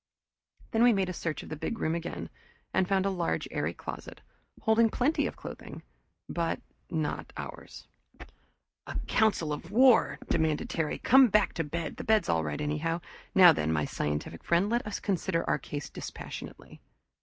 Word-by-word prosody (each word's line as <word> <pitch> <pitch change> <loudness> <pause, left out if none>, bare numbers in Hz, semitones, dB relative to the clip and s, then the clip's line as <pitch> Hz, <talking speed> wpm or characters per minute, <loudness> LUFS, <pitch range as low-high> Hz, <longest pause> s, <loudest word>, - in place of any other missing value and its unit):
Then 225 - +2
we 240 0 +7
made 195 -2 0
a - - -3
search 165 -3 -3
of - - -11
the 155 - -4
big 225 +9 -3
room 160 - 0
again 170 0 -5 0.4
and 185 - +2
found 195 0 +2
a 195 - +1
large 175 -3 -1
airy - - -1
closet, - - -8 0.4
holding 225 +1 +4
plenty 270 +8 +1
of - - -6
clothing, - - -9 0.4
but 170 -1 -1 0.3
not 160 -3 -2
ours. - - -8 1.0
"A - - -6
council 200 -9 +2
of 165 +3 -7
war!" 230 - +5
demanded 160 -2 0
Terry. 160 -3 -1
"Come 265 +2 +6
on - - +1
back 210 -1 +3
to 165 - -1
bed 160 +1 -4
the - - -5
bed's 215 -5 +2
all 80 -1 +2
right 75 -1 -3
anyhow. 155 +3 -1 0.4
Now 180 -3 +9
then, 80 - -1
my 75 -2 +1
scientific 75 +2 -3
friend, 175 +5 +2
let 240 -2 0
us 210 - -3
consider 185 -3 -1
our - - +1
case 145 +1 -6
dispassionately." - - -9
170 Hz, 175 wpm, -29 LUFS, 150-210 Hz, 1.0 s, Now